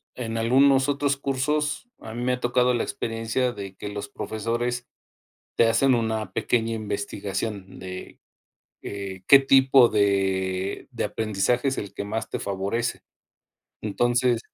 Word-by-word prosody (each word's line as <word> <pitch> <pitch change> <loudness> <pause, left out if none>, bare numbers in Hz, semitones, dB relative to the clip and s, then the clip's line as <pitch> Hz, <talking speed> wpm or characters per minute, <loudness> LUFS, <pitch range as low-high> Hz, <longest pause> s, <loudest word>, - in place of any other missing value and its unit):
en 115 -2 -4
algunos 135 +4 +4
otros 140 0 +1
cursos 145 - -1
a 110 - -9
mí 120 +1 -4
me 125 +1 +1
ha 125 - -2
tocado 125 +1 +2
la 120 - 0
experiencia 115 +2 -2
de 100 -3 -8
que 105 - -7
los 100 0 -5
profesores 120 +4 -3 0.7
te 115 - +5
hacen 130 +4 +4
una 110 -4 -1
pequeña 115 -1 0
investigación 100 -1 -4
de, 90 0 -8 0.6
eh, 95 -2 -6
qué 140 - +9
tipo 135 -2 +6
de 95 -2 0
de - - -3
aprendizaje 110 +4 0
es 135 - 0
el 100 - -5
que 100 - -5
más 110 +2 -3
te - - -3
favorece. 100 +5 -2 0.8
Entonces, 120 +3 +1
115 Hz, 140 wpm, -25 LUFS, 100-125 Hz, 0.8 s, qué